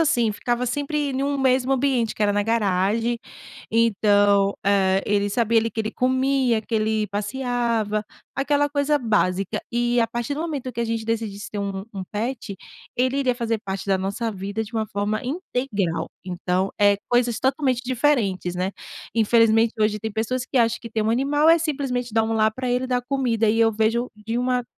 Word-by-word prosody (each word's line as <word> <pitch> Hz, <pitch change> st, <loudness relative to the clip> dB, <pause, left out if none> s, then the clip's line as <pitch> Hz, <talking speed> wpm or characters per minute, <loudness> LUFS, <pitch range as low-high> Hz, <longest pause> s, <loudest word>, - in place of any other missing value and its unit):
assim, 240 Hz, -8 st, +3 dB
ficava 240 Hz, +3 st, -1 dB
sempre 290 Hz, +3 st, -1 dB
em 265 Hz, 0 st, -2 dB
um 285 Hz, 0 st, 0 dB
mesmo 260 Hz, -1 st, +2 dB
ambiente, 255 Hz, -4 st, +1 dB
que -, -, -3 dB
era 205 Hz, -1 st, +3 dB
na 205 Hz, 0 st, +1 dB
garagem, 225 Hz, +2 st, +1 dB, 0.5 s
então, 205 Hz, -3 st, +3 dB
eh, 195 Hz, -1 st, +3 dB
ele 205 Hz, 0 st, +1 dB
sabia, 230 Hz, +1 st, +2 dB
ali, 225 Hz, -, -1 dB
que 220 Hz, -, -3 dB
ele 215 Hz, 0 st, -2 dB
comia, 260 Hz, -2 st, +1 dB
que 225 Hz, -, -14 dB
ele 215 Hz, 0 st, +1 dB
passeava, 220 Hz, 0 st, -1 dB, 0.3 s
aquela 290 Hz, +1 st, +2 dB
coisa 290 Hz, +1 st, +1 dB
básica. 195 Hz, -6 st, 0 dB
E 240 Hz, 0 st, +2 dB
a 230 Hz, -, +3 dB
partir 240 Hz, +4 st, -3 dB
do 300 Hz, -, -4 dB
momento 285 Hz, -6 st, -4 dB
que 235 Hz, -, -4 dB
a -, -, +1 dB
gente 225 Hz, -1 st, -2 dB
decidisse 220 Hz, -3 st, -3 dB
ter 210 Hz, -, -5 dB
um 195 Hz, -1 st, -3 dB
um 190 Hz, -, -4 dB
pet, 225 Hz, -1 st, -3 dB, 0.4 s
ele 255 Hz, +2 st, +1 dB
iria 260 Hz, -3 st, +1 dB
fazer 230 Hz, -2 st, -1 dB
parte 190 Hz, 0 st, -4 dB
da 195 Hz, -1 st, +2 dB
nossa 200 Hz, +5 st, -2 dB
vida 200 Hz, +2 st, -4 dB
de 220 Hz, -, -13 dB
uma 220 Hz, -1 st, 0 dB
forma 205 Hz, +2 st, -2 dB
integral, 250 Hz, -, -2 dB, 0.2 s
então, 185 Hz, +1 st, -1 dB
eh, 205 Hz, 0 st, +5 dB
coisas 240 Hz, -2 st, +2 dB
totalmente 265 Hz, -2 st, +1 dB
diferentes, 235 Hz, -9 st, +1 dB
né. 180 Hz, +1 st, -1 dB, 0.4 s
Infelizmente 225 Hz, 0 st, +4 dB
hoje 215 Hz, 0 st, +2 dB
tem 220 Hz, 0 st, -4 dB
pessoas 230 Hz, +4 st, -2 dB
que 265 Hz, -, -4 dB
acham 230 Hz, -1 st, +2 dB
que 230 Hz, -, -8 dB
ter 220 Hz, 0 st, -1 dB
um 215 Hz, -, +1 dB
animal 285 Hz, +6 st, +2 dB
é 330 Hz, +1 st, +7 dB
simplesmente 265 Hz, -7 st, -2 dB
dar 225 Hz, -, +4 dB
um 225 Hz, -, -2 dB
lar 220 Hz, 0 st, +3 dB
para 255 Hz, 0 st, -3 dB
ele 250 Hz, +1 st, 0 dB
dar 250 Hz, -1 st, 0 dB
comida, 245 Hz, -4 st, 0 dB
e 225 Hz, -, 0 dB
eu 225 Hz, 0 st, +4 dB
vejo 225 Hz, +3 st, +1 dB
de 225 Hz, +2 st, -3 dB
uma 250 Hz, 0 st, 0 dB
230 Hz, 190 wpm, -23 LUFS, 210-255 Hz, 0.5 s, é